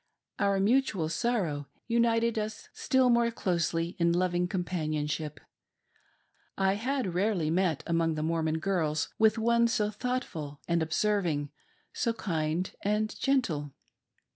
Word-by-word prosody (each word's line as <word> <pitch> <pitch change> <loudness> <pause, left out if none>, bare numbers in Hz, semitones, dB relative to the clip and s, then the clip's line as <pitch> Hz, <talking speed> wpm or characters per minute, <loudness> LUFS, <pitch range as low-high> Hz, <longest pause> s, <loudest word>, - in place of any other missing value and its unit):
Our 200 -1 +2
mutual 210 -6 +2
sorrow 165 - -1 0.2
united 230 -1 +2
us 215 0 -5
still 260 -1 +2
more 235 0 +4
closely 170 -5 -1
in 170 0 +3
loving 180 0 +1
companionship. 155 -5 -2 1.2
I 195 0 +3
had 245 -2 -1
rarely 180 -4 +1
met 175 -4 +1
among 165 -1 +1
the 155 - -2
Mormon 160 -1 0
girls 160 -4 0
with 220 0 +4
one 235 +1 +3
so 210 -2 0
thoughtful 200 - -4
and 170 -1 +1
observ 195 +5 +1
ing, 145 -2 -2 0.4
so 230 - 0
kind 165 -3 -2
and 210 +1 0
gentle. 165 - 0
185 Hz, 125 wpm, -29 LUFS, 160-225 Hz, 1.2 s, more